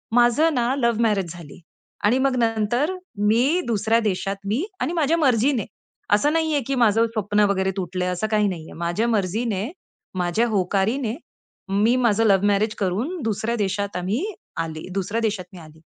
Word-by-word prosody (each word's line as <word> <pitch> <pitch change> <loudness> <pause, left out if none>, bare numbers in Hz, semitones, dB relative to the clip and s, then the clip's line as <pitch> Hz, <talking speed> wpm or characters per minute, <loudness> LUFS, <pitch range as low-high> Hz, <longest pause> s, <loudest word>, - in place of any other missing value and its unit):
माझं 245 +7 +4
ना 245 -1 +1
love 235 -3 +1
marriage 200 -6 +1
झाली 170 -4 -12 0.5
आणि 225 +5 +4
मग 270 -1 +2
नंतर 230 - 0 0.3
मी 260 +11 +3
दुसऱ्या 225 0 +2
देशात 195 -2 -1
मी 225 - 0 0.2
आणि 335 - -1
माझ्या 325 -1 +2
मर्जीने. 255 - +2 0.5
असं 290 +9 +3
नाहीये 320 -2 +1
की 275 - 0
माझं 225 0 +4
स्वप्न 210 -2 -1
वगैरे 190 -1 0
तुटलंय. 180 0 -2
असं 180 +4 -1
काही 210 -1 +3
नाहीये. 170 -5 -6
माझ्या 175 +7 -1
मर्जीने, 210 - -1 0.5
माझ्या 180 +6 +1
होकारीने 215 +4 0 0.5
मी 210 +5 +3
माझं 225 -1 +3
लव्ह 195 -2 +4
मॅरेज 210 +2 +1
करून 225 - -2
दुसऱ्या 225 +1 -1
देशात 200 +1 -2
आम्ही 195 - -1 0.4
आली 160 -1 -7
दुसऱ्या 200 +4 -2
देशात 210 -5 -1
मी 180 - -10
आली 160 -1 -15
215 Hz, 160 wpm, -23 LUFS, 195-240 Hz, 0.5 s, माझं